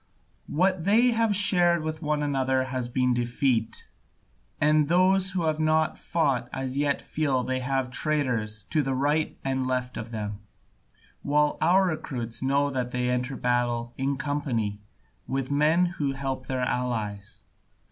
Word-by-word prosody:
What 185 +1 +1
they 230 +5 +5
have 225 -2 +2
shared 175 -4 +3
with 155 +1 -4
one 150 -1 0
another 130 -2 +1
has 130 -2 -3
been 125 +1 +1
defeat, 120 -1 -1 0.7
and 150 0 +3
those 185 +3 +3
who 175 - 0
have 155 -1 0
not 155 0 +2
fought 140 -7 -1
as 130 0 -3
yet 140 0 0
feel 140 -5 0
they 130 +1 -1
have 130 0 -1
traitors 125 -8 -1
to 155 - +3
right 145 +4 0
and 130 -1 0
left 125 -1 -2
of 110 +1 -6
them, 105 -3 -5 0.8
while 150 +1 +2
our 180 +4 +4
recruits 125 -9 -3
know 140 +2 +1
that 125 -2 -2
they 125 0 -1
enter 125 +2 -1
battle 120 -1 0
in 135 +1 -1
company 125 -8 -2 0.5
with 135 0 -2
men 155 +5 +3
who 150 -6 -2
help 135 -1 -4
their 130 -1 -2
allies. 110 -5 -3
135 Hz, 145 wpm, -26 LUFS, 125-155 Hz, 0.8 s, they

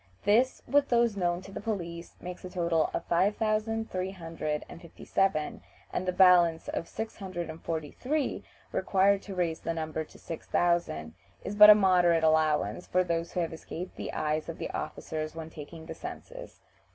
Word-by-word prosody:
This, 230 +6 +3
with 285 0 +3
those 235 -3 +3
known 175 -1 0
to 195 - -11
the - - -6
police, 175 -6 -4
makes 180 0 -8
a 185 - -6
total 170 -3 +1
of - - -3
5357, 185 -5 -1 0.3
and 185 - -1
the - - +3
balance 180 -3 +5
of 165 - -3
six 220 0 -6
hundred 175 -5 -5
and 160 - -11
forty 160 -3 -3
three 290 +2 -1
(643), - - -20 0.3
required 195 +1 +3
to 195 - -8
raise 170 -3 0
the 165 - -3
number 160 -1 -3
to - - -16
six 165 - -8
thousand 170 - 0 0.3
(6000), 200 - -4
is - - -6
but 210 0 +10
a 210 - +11
moderate 180 -4 +4
allowance 155 +2 +2
for 185 0 +2
those 170 -1 -2
who 180 - 0
have 165 -1 -2
escaped 170 +2 -7
the - - -5
eyes 155 0 -1
of - - -5
the - - -4
officers 155 0 -4
when 160 0 -7
taking 160 +2 -9
the - - -6
census. - - -9
175 Hz, 175 wpm, -29 LUFS, 160-195 Hz, 0.3 s, a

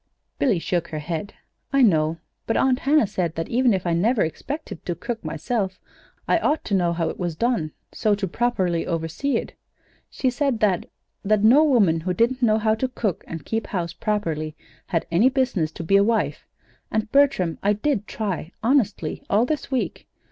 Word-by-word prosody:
Billy 245 -9 +3
shook 170 0 -1
her 155 - -5
head. 165 +5 -4 0.4
"I 275 -1 +4
know; 160 -6 +3 0.3
but 225 - +1
Aunt 260 -1 +3
Hannah 295 -1 +3
said 185 -5 -2
that 165 - -3
even 250 0 +3
if 190 -3 0
I 170 - +1
never 210 +7 +2
expected 205 - -5
to 175 - -1
cook, 235 +6 -5
myself, 185 +5 -2 0.5
I - - +3
ought 305 -2 0
to 205 - -3
know 175 -3 +2
how 165 -1 -1
it - - -7
was 175 -3 -2
done, 220 -7 0 0.2
so 210 -1 +1
to 200 -1 -2
properly 185 -5 0
oversee 165 - -1
it. - - -5 0.6
She 255 - 0
said 265 -2 0
that 195 -5 +2 0.4
that 210 0 +2
no 255 +8 +7
woman, 210 - +4
who 180 +2 -2
didn't 245 +6 +1
know 220 -3 +4
how 220 0 +2
to 220 +4 -1
cook 220 -8 -2
and 165 -3 -7
keep 225 -2 -2
house 170 -4 -3
properly, 165 -6 -2 0.3
had 165 -4 -1
any 200 +10 +5
business 245 - 0
to - - -6
be 195 +5 +4
a 200 - +5
wife. 225 +1 0 0.4
And, 220 0 -2
Bertram, 275 - +3
I 205 +1 +3
did 215 -1 -1
try, 190 -6 -4
honestly, 220 - +1
all 215 +4 +3
this 305 +2 -3
week. 260 -2 -2
205 Hz, 190 wpm, -23 LUFS, 170-245 Hz, 0.6 s, no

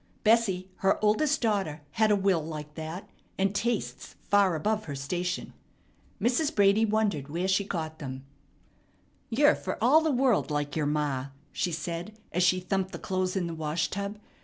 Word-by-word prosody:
Bessie, 210 -5 +3
her 195 0 +2
oldest 280 +8 +2
daughter, 195 -10 0
had 220 +6 +2
a 210 - +5
will 190 -5 +2
like 150 -1 -7
that, 160 +4 -6 0.3
and 195 +1 +1
tastes 230 +2 -2
far 200 -4 +3
above 215 +7 -1
her 145 - -5
station. 175 +6 -3 0.7
Mrs. 285 +6 +1
Brady 205 +2 +5
wondered 210 -10 0
where 175 +5 -1
she 195 +1 +2
got 160 -5 -4
them. 130 -2 -6 1.0
"You're 290 +6 +5
fer - - -4
all 275 +8 +5
the 320 - +1
world 255 - +2
like 145 -1 -2
yer 155 -2 0
ma," 145 -3 -1 0.2
she 180 - -1
said 170 +6 -5
as 180 - 0
she 185 +1 +4
thumped 190 +1 -2
the - - -4
clothes 185 0 -2
in 190 -2 0
the 170 - -4
wash 160 0 -1
tub. 200 +1 -3
185 Hz, 170 wpm, -28 LUFS, 160-215 Hz, 1.0 s, a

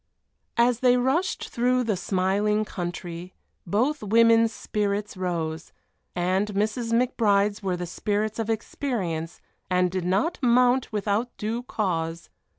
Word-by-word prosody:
As 235 0 +3
they 250 0 +4
rushed 270 +9 0
through 250 +1 +1
the 220 -4 0
smiling 200 +3 +1
country, 175 -2 -6 0.3
both 250 - +1
women's 230 +1 +4
spirits 205 -1 -2
rose, 165 -3 -3 0.4
and 185 +3 +1
Mrs. 220 +3 -1
McBride's 210 -4 +2
were 185 -3 -1
the 175 - -4
spirits 210 +5 -2
of 225 0 -2
experience 200 - -3 0.3
and 180 -1 +2
did 185 -1 -2
not 195 - 0
mount 250 0 +3
without 210 +3 -1
due 225 +3 -2
cause. 170 -8 -3
210 Hz, 125 wpm, -25 LUFS, 185-235 Hz, 0.4 s, they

